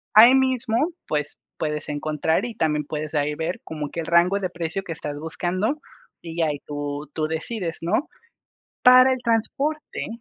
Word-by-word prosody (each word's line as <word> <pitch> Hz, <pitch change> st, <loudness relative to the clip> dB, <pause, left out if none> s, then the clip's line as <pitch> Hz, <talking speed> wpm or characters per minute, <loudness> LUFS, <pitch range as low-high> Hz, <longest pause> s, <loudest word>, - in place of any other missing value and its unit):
ahí 235 Hz, +5 st, +9 dB
mismo, 255 Hz, -4 st, +1 dB, 0.3 s
pues, 150 Hz, -1 st, -2 dB, 0.2 s
puedes 150 Hz, -1 st, -2 dB
encontrar 155 Hz, +4 st, 0 dB
y 235 Hz, -2 st, -5 dB
también 150 Hz, -3 st, 0 dB
puedes 150 Hz, +1 st, -4 dB
ahí 150 Hz, 0 st, +1 dB
ver 165 Hz, +3 st, -3 dB
como 150 Hz, -2 st, -5 dB
que 170 Hz, -, -6 dB
el -, -, -6 dB
rango 175 Hz, +4 st, +4 dB
de 185 Hz, -2 st, -2 dB
precio 170 Hz, +2 st, -3 dB
que 175 Hz, -, -7 dB
estás 145 Hz, -2 st, -6 dB
buscando 185 Hz, -, -2 dB, 0.4 s
y 165 Hz, 0 st, -8 dB
ya 165 Hz, -, +3 dB
ahí 145 Hz, -2 st, -2 dB
tú 145 Hz, 0 st, -4 dB
tú 155 Hz, -, -1 dB
decides, 165 Hz, +2 st, -3 dB
¿no?, 200 Hz, -, 0 dB, 0.8 s
para 255 Hz, +1 st, +8 dB
el 260 Hz, -, -1 dB
transporte, 275 Hz, +7 st, -1 dB
165 Hz, 170 wpm, -24 LUFS, 150-220 Hz, 0.8 s, ahí